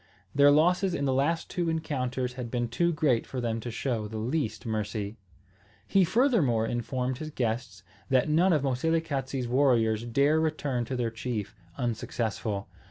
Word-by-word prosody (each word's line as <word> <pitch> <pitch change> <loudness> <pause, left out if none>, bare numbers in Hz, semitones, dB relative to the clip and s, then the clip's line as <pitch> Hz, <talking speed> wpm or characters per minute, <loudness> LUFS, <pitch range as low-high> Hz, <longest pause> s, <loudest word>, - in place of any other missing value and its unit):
Their 140 +1 +6
losses 175 +5 +3
in 140 - -1
the 135 - +2
last 150 +5 +1
two 175 -2 -1
encounters 130 -6 -2
had 125 -2 -5
been 120 -1 -1
too 170 +9 +1
great 145 -7 +1
for 130 - -4
them 115 -2 -1
to 120 - -5
show 115 -2 -2
the 110 +1 -6
least 125 +2 -2
mercy. 105 -1 -3 0.7
He 195 - +4
furthermore 175 - +3
informed 125 +2 -2
his 155 - -5
guests 110 -7 -3 0.3
that 130 0 +3
none 170 +5 +4
of 150 -4 +2
Moselekatse's 135 -2 -1
warriors 120 -4 +3
dare 140 +6 +3
return 145 -6 -1
to 130 - -4
their 120 -2 -1
chief 110 -3 -4 0.2
unsuccessful. 110 -3 -2
130 Hz, 160 wpm, -28 LUFS, 115-155 Hz, 0.7 s, Their